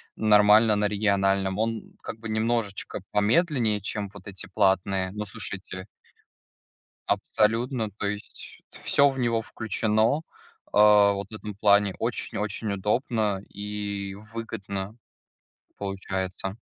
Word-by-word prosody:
нормально 105 +1 +5
на 105 0 +2
региональном, 100 -1 +1
он 115 0 -2
как 110 - -7
бы 110 - -7
немножечко 110 -2 -1
помедленнее, 110 - +2
чем 100 0 -3
вот 100 -1 -12
эти 95 -1 -8
платные, 95 -2 +1
но 105 +1 -4
слушайте 100 -3 -5 1.2
Абсолютно, 115 +1 +1
то 105 +1 -5
есть 105 +1 -7
всё 140 0 +3
в 135 -1 -4
него 120 -2 +1
включено, 110 +4 0 0.5
а, 105 -1 +7
вот 100 0 -5
в 110 - -9
этом 105 -1 -7
плане 100 -1 +4
очень-очень 105 +1 -3
удобно 105 0 0
и 100 -1 -4 0.2
выгодно 100 -3 -5 0.9
получается. 95 -1 -3
105 Hz, 110 wpm, -26 LUFS, 100-110 Hz, 1.2 s, а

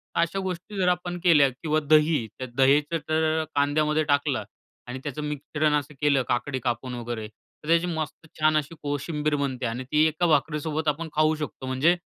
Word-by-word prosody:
अशा 170 +3 +1
गोष्टी 190 +2 -5
जर 185 -2 +1
आपण 175 0 0
केल्या 150 -6 +6
किंवा 155 +4 -1
दही. 155 -5 +4
त्या 130 - -5
दहीचं 145 +4 +3
तर 160 0 +1
कांद्यामध्ये 150 +2 +2
टाकलं 140 -4 +1 0.4
आणि 130 +2 -5
त्याचं 145 0 -4
मिश्रण 150 +1 -1
असं 145 +2 -10
केलं 140 -3 +3
काकडी 130 +2 -1
कापून 125 0 -2
वगैरे 120 -2 -5 0.4
तर 150 - -11
त्याची 170 +1 +3
मस्त 160 -1 -4
छान 155 0 +4
अशी 155 +3 -3
कोशिंबीर 150 +1 -1
बनते 130 -3 -2
आणि 115 +3 -3
ती 150 +1 +4
एका 160 +3 0
भाकरी 150 0 +2
सोबत 155 +1 -3
आपण 160 +3 0
खाऊ 155 +1 +3
शकतो. 150 -3 -6
म्हणजे 140 +7 +2
150 Hz, 180 wpm, -26 LUFS, 140-160 Hz, 0.4 s, केल्या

